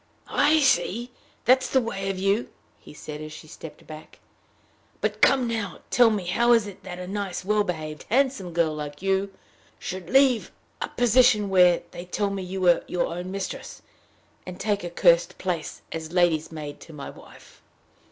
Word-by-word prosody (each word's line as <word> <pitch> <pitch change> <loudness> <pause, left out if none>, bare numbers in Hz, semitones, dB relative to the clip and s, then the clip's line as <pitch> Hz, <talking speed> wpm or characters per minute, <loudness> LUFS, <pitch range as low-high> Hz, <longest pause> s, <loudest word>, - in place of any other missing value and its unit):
"I 310 +1 +5
see! 240 -1 +1 0.3
that's 260 +1 +4
the 265 - +4
way 195 -5 -3
of 195 - -2
you!" 195 +5 0 0.3
he - - -14
said, 150 0 -8
as 155 0 -7
she 150 - -10
stepped 155 0 -11
back. 155 0 -11 0.8
"But - - -2
come 260 -3 +4
now, 220 -5 -3
tell 240 -2 +6
me 205 -4 -2
how 235 +7 +3
it - - +8
is 200 - -7
that 180 -1 -8
a 180 - -6
nice, 195 -1 -4
well 210 +1 +2
behaved, 155 -5 -5
handsome 255 -7 +1
girl 165 -2 +1
like 150 +2 -7
you, 195 0 +1 0.5
should 185 -2 -6
leave 265 -3 +4 0.3
a - - -1
position 245 -3 +4
where, 180 -2 +5
they 175 - -8
tell 200 +2 -1
me, 195 -1 -3
you 185 +1 -5
were 175 -2 +4
your 180 - 0
own 180 +1 -5
mistress, 195 0 -6 0.6
and 180 -1 -9
take 205 -2 -1
a 175 - -4
cursed 170 -1 +3
place 170 -5 -4
as 160 -1 -5
lady's 170 -3 +2
maid 150 -2 -7
to 165 - -13
my 140 -2 -7
wife." - - -17
185 Hz, 180 wpm, -25 LUFS, 170-215 Hz, 0.8 s, it